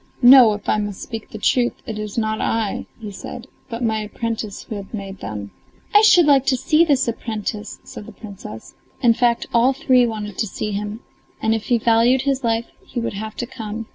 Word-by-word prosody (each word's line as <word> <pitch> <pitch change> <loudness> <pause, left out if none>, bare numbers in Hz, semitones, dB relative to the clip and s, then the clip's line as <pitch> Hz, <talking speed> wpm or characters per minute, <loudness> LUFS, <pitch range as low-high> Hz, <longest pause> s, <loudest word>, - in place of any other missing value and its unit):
"No, 245 -3 +9
if 205 0 -8
I 215 - +2
must 205 -2 -4
speak 225 -1 -7
the - - -8
truth, 240 +3 +2
it 220 -1 -5
is 210 0 -6
not 220 -1 0
I," 225 -3 -1
he 215 -3 -7
said, 230 +4 -8 0.2
"but 230 0 -4
my 220 -1 +1
apprentice, 215 -1 -4
who - - -8
has 200 - -7
made 195 -3 -6
them." 100 0 -6 0.4
"I 415 - +8
should 355 -6 +6
like 280 -3 +5
to 260 - +3
see 305 +6 +3
that 280 -6 +2
apprentice," 215 -2 -4
said 210 - -10
the - - -9
Princess. 195 - -10 0.3
In 235 -1 +6
fact 235 0 +1
all 245 +3 +4
three 255 -2 +3
wanted 210 -3 -5
to 220 - 0
see 210 +2 -4
him, 210 +3 -4 0.4
and 220 - +1
if 220 -1 -2
he 240 - +3
valued 235 +3 +3
his 275 -1 0
life, 230 0 +1 0.2
he - - -5
would 230 - -3
have 215 +2 -6
to - - -3
come. 225 -3 -6
225 Hz, 210 wpm, -21 LUFS, 210-245 Hz, 0.4 s, No